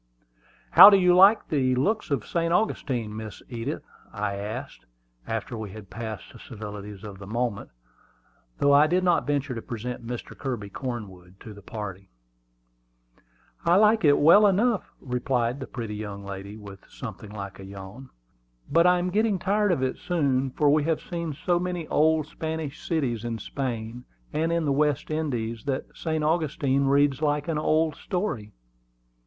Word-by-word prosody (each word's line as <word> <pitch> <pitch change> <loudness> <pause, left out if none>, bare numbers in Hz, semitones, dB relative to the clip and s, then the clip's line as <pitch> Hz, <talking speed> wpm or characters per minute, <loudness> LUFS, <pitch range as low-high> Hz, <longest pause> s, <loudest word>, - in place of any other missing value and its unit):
"How - - +12
do 200 - +6
you 180 -1 +4
like 195 +4 +6
the 130 -4 +2
looks 210 - 0
of 135 -7 -1
St. 170 -1 -1
Augustine, 125 - 0
Miss 110 -1 -8
Edith?" 120 +4 -4 0.3
I 105 -1 -2
asked, 100 +2 -6 0.4
after 115 +2 -3
we 110 -2 -5
had 105 -3 -11
passed 110 +3 -7
the 115 - -13
civilities 105 -3 -8
of 100 -2 -9
the 100 - -9
moment, 115 -1 -2 0.9
though 140 0 +4
I 145 +2 +6
did 180 +3 +1
not 175 -4 +2
venture 140 -2 0
to 115 - -5
present 120 +2 -6
Mr. 120 0 -6
Kirby 120 -7 -5
Cornwood 95 -8 -7
to 110 - -9
the 100 - -13
party. 100 -2 -7 1.5
"I 170 0 +4
like 215 +2 +5
it 145 -2 +6
well 200 +8 +7
enough," 210 +2 +1
replied 125 0 -1
the 130 - -6
pretty 115 -4 -5
young 100 -2 -6
lady, 100 +1 -7
with 100 -2 -11
something 110 -3 -8
like 100 -2 -7
a - - -8
yawn. 100 +6 -10 0.6
"But 170 +3 +5
I 180 0 +5
am 180 +1 -1
getting 215 0 +2
tired 205 +3 +1
of 135 -7 0
it 130 - -1
so 180 - -4
soon; 135 -2 +2
for 145 +3 0
we 150 0 +3
have 160 -1 +1
seen 170 -4 -5
so 175 +4 0
many 180 -2 -3
old 155 0 +3
Spanish 160 -2 -5
cities 130 -9 -1
in 115 -1 -3
Spain 120 -2 -5 0.3
and 160 +2 0
in 170 -1 0
the 145 - +1
West 150 +1 +1
Indies, 120 -8 -2
that 135 -2 -3
St. 160 -2 -2
Augustine 150 -4 +1
reads 140 0 +3
like 150 0 0
an 160 -2 0
old 155 0 +1
story." 175 - -3
135 Hz, 170 wpm, -26 LUFS, 110-160 Hz, 1.5 s, How